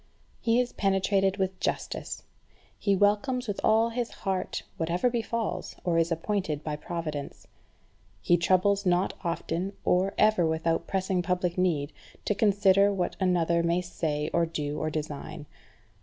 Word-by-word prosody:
He 230 +1 +2
is 250 0 -1
penetrated 195 0 +1
with 190 -1 -1
justice; - - -3 0.6
he 200 -1 +2
welcomes 210 +6 +2
with 205 - -3
all 225 +1 +4
his 235 0 -2 0.2
heart 190 -1 -1
whatever 175 +9 +1
befalls, 230 -1 -2
or 170 -2 +2
is 165 +1 +1
appointed 165 -3 -1
by 150 -1 -2
Providence. 150 -2 -5 0.7
He 175 - +3
troubles 185 +3 +2
not 180 0 +2
often, 170 +2 -2
or 185 +2 +2
ever 215 -4 +4
without 165 0 0
pressing 190 -1 0
public 180 -1 -1
need, 160 -6 0 0.3
to - - +2
consider 200 -1 +4
what 185 -3 -1
another 170 -3 +2
may 170 +1 +1
say, 155 -4 -2
or 170 0 +2
do, 150 -2 -3
or 155 - -1
design. 150 0 -5
180 Hz, 140 wpm, -28 LUFS, 165-200 Hz, 0.7 s, all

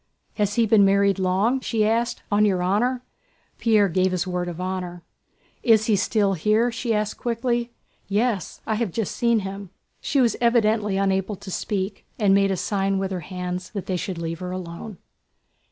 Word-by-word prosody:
"Has 205 -1 0
he 235 - +3
been 215 -1 +5
married 200 0 +3
long?" 195 +8 +2
she 225 -4 0
asked. 230 +2 0
"On 205 +1 +4
your 190 -4 +2
honor?..." 245 +7 +1 0.6
Pierre 215 -3 +4
gave 185 +1 +1
his 180 0 0
word 180 -1 -2
of 175 -1 -6
honor. 180 -2 -4 0.6
"Is 220 -2 +4
he 215 - +3
still 200 0 +1
here?" 215 +7 +2
she 230 +1 -3
asked, 210 -1 -1
quickly. 235 0 -1 0.4
"Yes, 205 -1 -1
I 220 - 0
have 225 -5 -1
just 220 +1 -3
seen 235 -3 +2
him." 195 0 -6 0.3
She 280 - 0
was 240 -3 +3
evidently 215 -4 +2
unable 195 +1 0
to 190 0 -10
speak 195 0 -3
and 205 -4 +3
made 195 0 +4
a 190 - 0
sign 195 +1 0
with 190 0 -2
her 185 - -2
hands 180 +1 -5
that 200 -4 -5
they 185 - -2
should 180 0 -3
leave 165 0 -4
her 180 -1 -5
alone. 180 +2 -7
200 Hz, 185 wpm, -24 LUFS, 185-225 Hz, 0.6 s, been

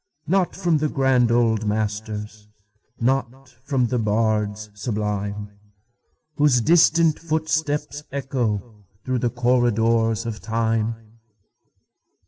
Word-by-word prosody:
Not 185 +1 +1
from 175 -5 +1
the 155 0 0
grand 130 -4 +2
old 110 -2 +2
masters, 105 0 -3 0.5
Not 130 +1 -1
from 135 -3 +1
the 125 +1 -1
bards 105 -1 0
sublime, 105 -1 -3 0.9
Whose 145 -4 +4
distant 165 +3 +4
footsteps 155 -2 -1
echoThrough 120 -6 -3 0.4
the 120 - +1
corridors 115 -2 +1
of 115 -2 -4
Time. 115 0 -2
115 Hz, 95 wpm, -23 LUFS, 110-135 Hz, 0.9 s, Whose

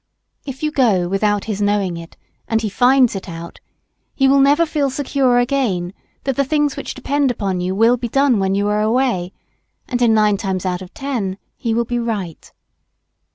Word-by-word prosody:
If 270 +2 -7
you 305 - 0
go 215 -11 +2
without 205 +2 0
his 210 -2 -3
knowing 205 -3 +1
it, 170 0 -10 0.3
and 225 0 0
he 215 - -1
finds 250 +2 +3
it 195 -1 -6
out, 170 0 -9 0.6
he 270 - +3
never 280 +3 +4
will - - +1
feel 295 -3 0
secure 265 -2 +1
again 240 -9 0 0.3
that 270 -2 -1
the 280 - +2
things 295 0 0
which - - -6
depend 280 +1 0
upon 195 -6 -2
you 185 +1 -2
will 230 +4 +4
be 240 0 -4
done 270 -3 +3
when 195 0 0
you 200 +1 0
are 210 0 +1
away, 220 -5 0 0.6
and 245 -5 -2
in 230 -2 +4
nine 210 -2 +3
cases 190 -1 -3
out 180 0 -2
of 185 - -10
ten 240 -10 -3 0.2
he 230 -2 -2
will 235 0 +1
be 240 +1 -2
right. 205 -8 -4
225 Hz, 195 wpm, -19 LUFS, 195-270 Hz, 0.6 s, never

